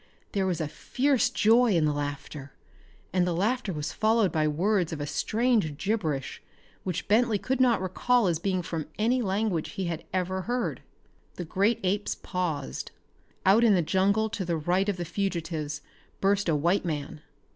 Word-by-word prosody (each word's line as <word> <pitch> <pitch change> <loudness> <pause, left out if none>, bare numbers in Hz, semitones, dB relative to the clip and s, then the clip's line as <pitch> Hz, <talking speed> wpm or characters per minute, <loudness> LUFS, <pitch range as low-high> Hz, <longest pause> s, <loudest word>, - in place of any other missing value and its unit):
There 195 -2 0
was 180 -2 -1
fierce 255 - +1
joy 230 -1 +4
in 160 -2 +3
the 150 - +1
laughter, 145 -1 -5 0.6
and 180 -1 +2
the 175 - 0
laughter 215 +3 0
was 150 -3 -4
followed 220 -3 +2
by 155 -1 +1
words 175 +3 +1
of 160 - -4
a 145 - -2
strange 215 - 0
gibberish 160 - -2 0.4
which 180 -3 -3
Bentley 220 +1 +3
could 260 +5 -1
not 245 -3 +4
recall 240 +6 +2
as 170 -3 +1
being 185 0 -1
from 165 -3 -4
any 240 +4 +2
language 195 -5 -1
he 190 - -3
had 165 -1 -3
ever 185 0 -1
heard. 245 -1 -1 0.5
The 175 - -5
great 200 +7 +1
apes 200 +2 0
paused. 170 -7 -3 0.6
Out 200 +5 +6
of 225 -3 +6
the 180 -3 +3
jungle 200 +6 +2
to 200 - -3
the 170 -2 -1
right 180 +6 +1
of 200 - -1
the 175 - -3
fugitives 165 -5 -3 0.4
burst 195 -1 +2
a 160 - +3
white 170 +7 +2
man. 155 -2 -4
185 Hz, 170 wpm, -27 LUFS, 160-215 Hz, 0.6 s, Out